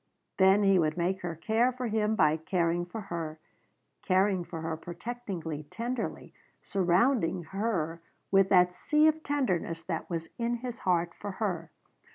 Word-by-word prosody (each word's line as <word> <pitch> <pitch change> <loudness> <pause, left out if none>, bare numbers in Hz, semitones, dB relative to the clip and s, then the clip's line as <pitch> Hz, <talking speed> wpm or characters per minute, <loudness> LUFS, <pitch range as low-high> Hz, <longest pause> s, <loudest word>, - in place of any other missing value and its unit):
Then 190 +2 +5
he 195 -2 +5
would 155 0 +1
make 185 +2 0
her 175 -2 -4
care 225 +9 +2
for 255 0 -5
him 220 -1 +1
by 155 -5 +4
caring 170 +1 0
for 215 +5 -6
her 160 -2 -4 0.6
caring 190 -1 +2
for 165 -1 -7
her 160 0 -2
protectingly, 170 -3 -6
tenderly, 230 +5 -4 0.3
surrounding 190 0 +2
her 175 -6 -1 0.3
with 195 -1 +5
that 180 -1 +5
sea 300 +10 +2
of 315 0 +3
tenderness 185 - -1
that 165 -2 -4
was 165 -2 -3
in 235 +1 0
his 240 0 -6
heart 175 -2 +1
for 205 +1 -6
her. 180 -6 -2
185 Hz, 155 wpm, -29 LUFS, 170-225 Hz, 0.6 s, Then